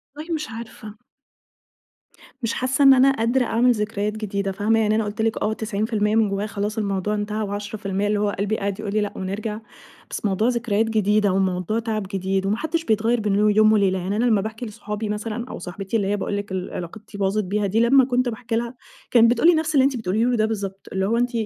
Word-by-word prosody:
والله 315 Hz, +3 st, -5 dB
مش 305 Hz, -2 st, -3 dB
عارفة. 225 Hz, -2 st, -9 dB, 1.5 s
مش 230 Hz, -1 st, -1 dB
حاسّة 260 Hz, +2 st, +1 dB
إن 270 Hz, -1 st, +9 dB
أنا 265 Hz, +1 st, +5 dB
قادرة 245 Hz, 0 st, +1 dB
أعمل 245 Hz, +2 st, +3 dB
ذكريات 210 Hz, -1 st, -1 dB
جديدة 200 Hz, -2 st, -2 dB
فاهمة؟ 210 Hz, +3 st, +1 dB
يعني 215 Hz, -1 st, +2 dB
أنا 220 Hz, -, +1 dB
قُلت 210 Hz, +2 st, -4 dB
لِك 225 Hz, 0 st, 0 dB
آه 220 Hz, -, +1 dB
90% 215 Hz, 0 st, -1 dB
من 220 Hz, -2 st, +3 dB
جوايا 200 Hz, +2 st, -2 dB
خلاص 210 Hz, +1 st, -3 dB
الموضوع 200 Hz, 0 st, -1 dB
انتهى، 210 Hz, +1 st, -2 dB
و10% 205 Hz, -1 st, -3 dB
اللي 210 Hz, 0 st, +1 dB
هو 205 Hz, 0 st, +1 dB
قلبي 205 Hz, +2 st, 0 dB
قاعد 200 Hz, 0 st, -3 dB
يقول 210 Hz, -2 st, -4 dB
لي 215 Hz, -, +2 dB
لأ، 205 Hz, -, -3 dB
ونرجع 210 Hz, +3 st, -4 dB, 0.5 s
بس -, -, -4 dB
موضوع 205 Hz, +3 st, +1 dB
ذكريات 230 Hz, -3 st, +1 dB
جديدة، 210 Hz, -2 st, +2 dB
وموضوع 190 Hz, +2 st, 0 dB
تَعَب 220 Hz, -3 st, -2 dB
جديد 190 Hz, 0 st, -1 dB
وما 205 Hz, +2 st, +1 dB
حدّش 320 Hz, +4 st, -2 dB
بيتغيّر 225 Hz, +2 st, +2 dB
بين 205 Hz, -2 st, 0 dB
يوم 210 Hz, +1 st, +4 dB
وليلة، 195 Hz, -3 st, +2 dB
يعني 190 Hz, +3 st, -2 dB
أنا 230 Hz, +3 st, +1 dB
لما 220 Hz, -5 st, +3 dB
باحكي 220 Hz, +3 st, -5 dB
لاصحابي 210 Hz, 0 st, -5 dB
مثلًا 220 Hz, +3 st, -3 dB
أو -, -, -6 dB
صاحبتي 195 Hz, +5 st, -3 dB
اللي 200 Hz, -3 st, -1 dB
هي 205 Hz, +1 st, 0 dB
باقول 205 Hz, 0 st, -2 dB
لِك 205 Hz, -1 st, -5 dB
اللي 185 Hz, -1 st, -4 dB
علاقتي 200 Hz, +4 st, -8 dB
باظت 200 Hz, +2 st, 0 dB
بيها 205 Hz, +2 st, -1 dB
دي 210 Hz, +4 st, +1 dB
لما 255 Hz, +3 st, +5 dB
كنت 250 Hz, -1 st, +1 dB
باحكي 230 Hz, 0 st, -4 dB
لها 235 Hz, +2 st, -2 dB, 0.4 s
كانت 230 Hz, -1 st, +6 dB
بتقول 245 Hz, +7 st, +3 dB
لي -, -, +6 dB
نفس 315 Hz, 0 st, -1 dB
اللي 270 Hz, -, +6 dB
أنتِ 275 Hz, -2 st, +1 dB
بتقوليه 220 Hz, +1 st, 0 dB
لي 250 Hz, 0 st, +2 dB
ده 215 Hz, -1 st, +2 dB
بالضبط، 195 Hz, -3 st, -4 dB
اللي 190 Hz, 0 st, 0 dB
هو 225 Hz, +4 st, +1 dB
أنتِ 245 Hz, +1 st, +1 dB
215 Hz, 220 wpm, -23 LUFS, 200-230 Hz, 1.5 s, إن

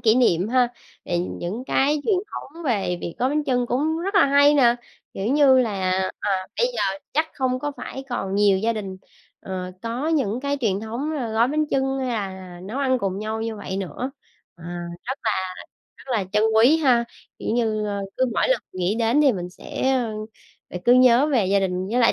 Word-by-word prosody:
kỷ 225 Hz, -2 st, +4 dB
niệm 210 Hz, -6 st, +3 dB
ha. 250 Hz, 0 st, +3 dB, 0.4 s
Thì 175 Hz, -, -1 dB
những 180 Hz, +5 st, -4 dB
cái 290 Hz, +2 st, +2 dB
truyền 430 Hz, -, +3 dB, 0.2 s
thống 330 Hz, +5 st, -8 dB
về 200 Hz, -, 0 dB
việc 170 Hz, -, -5 dB
gói 255 Hz, -, +2 dB
bánh 300 Hz, +2 st, 0 dB
chưng 250 Hz, -3 st, +1 dB
cũng 300 Hz, +7 st, 0 dB
rất 390 Hz, +4 st, -3 dB
là 400 Hz, -, +6 dB
hay 285 Hz, +1 st, +5 dB
nè, 240 Hz, -4 st, +5 dB, 0.4 s
kiểu 195 Hz, -, -3 dB
như 270 Hz, 0 st, +5 dB
là, 240 Hz, -3 st, +2 dB, 0.5 s
à, -, -, -1 dB, 0.3 s
bây 485 Hz, -, +4 dB
giờ -, -, -2 dB, 0.3 s
chắc 310 Hz, +2 st, +2 dB
không 255 Hz, -2 st, 0 dB
có 290 Hz, +2 st, -3 dB
phải 270 Hz, -, -7 dB
còn 195 Hz, -5 st, -3 dB
nhiều 200 Hz, -2 st, +4 dB
gia 230 Hz, +3 st, +1 dB
đình, 195 Hz, -4 st, -5 dB, 0.4 s
ờ, 185 Hz, -1 st, -5 dB
có 240 Hz, +7 st, -2 dB
những 255 Hz, -8 st, 0 dB
cái 280 Hz, +1 st, -1 dB
truyền 200 Hz, -4 st, 0 dB
thống 235 Hz, +8 st, -4 dB
là 260 Hz, -6 st, -2 dB
gói 230 Hz, +3 st, +3 dB
bánh 305 Hz, +1 st, 0 dB
chưng 270 Hz, -1 st, 0 dB
hay 260 Hz, -1 st, -2 dB
là 190 Hz, -5 st, -5 dB
nấu 215 Hz, +8 st, -5 dB
ăn 260 Hz, -2 st, +2 dB
cùng 195 Hz, -2 st, -2 dB
nhau 220 Hz, +1 st, -3 dB
như 225 Hz, -1 st, -3 dB
vậy 190 Hz, -2 st, -5 dB
nữa. 200 Hz, +7 st, -4 dB, 0.5 s
À, 170 Hz, -, -14 dB, 0.4 s
rất 265 Hz, +3 st, -3 dB
là 220 Hz, -, +1 dB, 0.6 s
rất -, -, -16 dB
là 210 Hz, -5 st, +1 dB
trân 210 Hz, 0 st, +3 dB
quý 240 Hz, +8 st, +6 dB
ha, 255 Hz, -7 st, +3 dB, 0.3 s
kiểu -, -, -5 dB
như, 220 Hz, -3 st, 0 dB
ơ, 200 Hz, -1 st, -2 dB, 0.2 s
cứ 260 Hz, -, +3 dB
mỗi -, -, +2 dB
lần -, -, +2 dB
nghĩ 185 Hz, +2 st, -1 dB
đến 230 Hz, +5 st, +2 dB
thì 285 Hz, -3 st, +5 dB
mình 180 Hz, -3 st, -5 dB
sẽ, 260 Hz, +7 st, -2 dB
ơ, 245 Hz, -4 st, 0 dB, 0.6 s
lại 180 Hz, -, -5 dB
cứ 240 Hz, -, +6 dB
nhớ 255 Hz, +2 st, +6 dB
về 250 Hz, -10 st, +2 dB
gia 200 Hz, +1 st, +3 dB
đình, 185 Hz, 0 st, -1 dB
với 245 Hz, -, +1 dB
lại 235 Hz, -, +5 dB
240 Hz, 215 wpm, -23 LUFS, 200-270 Hz, 0.6 s, là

